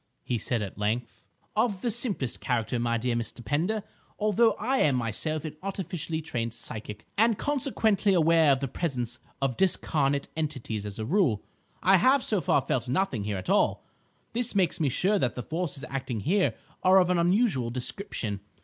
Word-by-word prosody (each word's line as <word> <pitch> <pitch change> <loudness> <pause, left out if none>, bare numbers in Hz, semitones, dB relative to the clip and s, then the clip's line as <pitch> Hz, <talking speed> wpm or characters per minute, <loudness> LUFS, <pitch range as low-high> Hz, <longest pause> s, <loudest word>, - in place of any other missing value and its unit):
he 120 - -1
said 115 -2 -1
at 100 0 -7
length. 110 +4 -2 0.3
"Of 215 -3 +1
the 240 - +1
simplest 205 - 0
character, 120 -2 -1
my 115 0 +1
dear 120 +1 -1
Mr. 120 +1 -4
Pender. 185 +9 0 0.3
Although 215 +2 +3
I 260 +5 -1
am 145 - +3
myself 135 +7 -2
an 155 -1 -5
artificially 175 -4 -4
trained 115 -6 -3
psychic, 105 -3 -6
and 225 -1 +4
consequently 225 -8 +1
aware 165 -2 +5
of 135 -1 +2
the 135 - -1
presence 125 -5 -3 0.2
of 130 -3 0
discarnate 145 -6 +1
entities 130 -9 -3
as 100 - -7
a 110 - -3
rule, 145 - +2 0.4
I 190 +1 +6
have 260 +8 +4
so 210 -4 +1
far 140 - +3
felt 125 -1 -2
nothing 130 - 0
here 105 -2 -2
at 95 - -7
all. - - +2 0.5
This 240 -1 0
makes 185 -2 +2
me 150 -4 +2
sure 195 +10 +2
that 125 -8 0
the 125 - -4
forces 155 -4 -3
acting 130 -5 -3
here 190 - +2 0.3
are 185 +1 +6
of 180 -1 +4
an 180 - +2
unusual 175 - +2
description. 120 - -2
150 Hz, 175 wpm, -28 LUFS, 120-195 Hz, 0.5 s, I